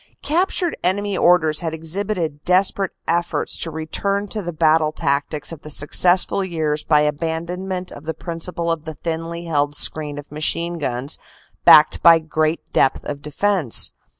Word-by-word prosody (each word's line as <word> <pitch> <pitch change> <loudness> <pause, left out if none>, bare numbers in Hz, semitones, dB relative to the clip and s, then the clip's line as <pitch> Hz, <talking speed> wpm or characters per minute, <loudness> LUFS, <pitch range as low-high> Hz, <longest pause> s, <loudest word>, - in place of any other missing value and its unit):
Captured 350 +2 0
enemy 200 +2 0
orders 160 -4 +3
had 160 -2 -3
exhibited 165 -2 -3
desperate 190 +1 +2
efforts 170 +1 -1
to 165 - -3
return 200 +6 -2
to 215 - -3
the 175 -2 -5
battle 155 -1 +2
tactics 145 +1 -2
of 160 -3 -9
the 150 - -10
successful 175 +6 +3
years 155 -4 -2
by 150 -2 +3
abandon 165 +5 -3
ment 185 -1 -4
of 145 - -11
the 160 0 -4
principle 170 0 -3
of 160 -2 -4
the 160 -1 -7
thinly 165 +1 -5
held 145 -3 0
screen 150 -1 -1
of 145 0 -10
machine 170 +3 -1
guns 130 0 -3 0.5
backed 155 +1 +7
by 165 -1 +7
great 155 0 -1
depth 135 - +2
of 145 -1 -5
defense. 150 - +1
165 Hz, 155 wpm, -20 LUFS, 150-180 Hz, 0.5 s, backed